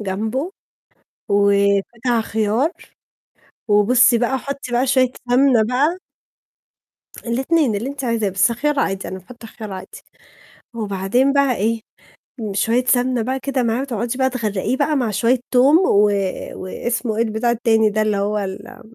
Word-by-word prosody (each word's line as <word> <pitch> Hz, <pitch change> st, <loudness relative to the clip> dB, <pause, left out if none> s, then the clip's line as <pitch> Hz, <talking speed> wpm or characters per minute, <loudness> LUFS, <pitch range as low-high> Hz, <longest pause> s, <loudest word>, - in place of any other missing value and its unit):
جمبه، 220 Hz, -, -3 dB, 0.8 s
وبتاع 200 Hz, +4 st, +2 dB
خيار، 220 Hz, +6 st, 0 dB, 1.0 s
وبُصّي 235 Hz, +4 st, +4 dB
بقى 250 Hz, +3 st, 0 dB
حطي 275 Hz, -1 st, -6 dB
بقى 245 Hz, +2 st, +2 dB
شوية 255 Hz, -1 st, +2 dB, 0.2 s
سمنة 250 Hz, -2 st, +4 dB
بقى 290 Hz, +8 st, +1 dB, 1.3 s
الاتنين، 265 Hz, +2 st, +1 dB
اللي 225 Hz, +6 st, -3 dB
أنتِ 275 Hz, -1 st, -6 dB
عايزاه، 230 Hz, -4 st, 0 dB
بس 195 Hz, +5 st, +2 dB
خيار 295 Hz, +4 st, -1 dB
عادي، 195 Hz, 0 st, -2 dB
أنا 190 Hz, -, -6 dB
باحط 230 Hz, +5 st, -14 dB
خيار 220 Hz, -2 st, -9 dB
عادي. 185 Hz, -1 st, -9 dB, 0.7 s
وبعدين 215 Hz, +5 st, 0 dB
بقى 280 Hz, -3 st, +2 dB
إيه، 225 Hz, +3 st, -1 dB, 0.7 s
شوية 230 Hz, +5 st, +1 dB
سمنة 250 Hz, -1 st, +2 dB
بقى 260 Hz, +3 st, -2 dB
كده 270 Hz, -1 st, -1 dB
معاه 235 Hz, +1 st, 0 dB
وتقعدي 240 Hz, -2 st, -3 dB
بقى 260 Hz, 0 st, +2 dB
تغرّقيه 220 Hz, -1 st, -2 dB
بقى، 295 Hz, +2 st, 0 dB
مع 245 Hz, -5 st, 0 dB
شوية 235 Hz, +4 st, +1 dB
توم 270 Hz, +5 st, +5 dB
و 210 Hz, -, +3 dB, 0.4 s
واسمه 225 Hz, +3 st, -3 dB
إيه 230 Hz, -, +2 dB
البتاع 220 Hz, +1 st, -1 dB
التاني 225 Hz, -2 st, +2 dB
ده 215 Hz, +1 st, 0 dB
اللي 210 Hz, -1 st, 0 dB
هو 205 Hz, +1 st, -1 dB
ال 195 Hz, +2 st, -5 dB
آمم 235 Hz, -1 st, -15 dB
235 Hz, 145 wpm, -20 LUFS, 210-260 Hz, 1.3 s, توم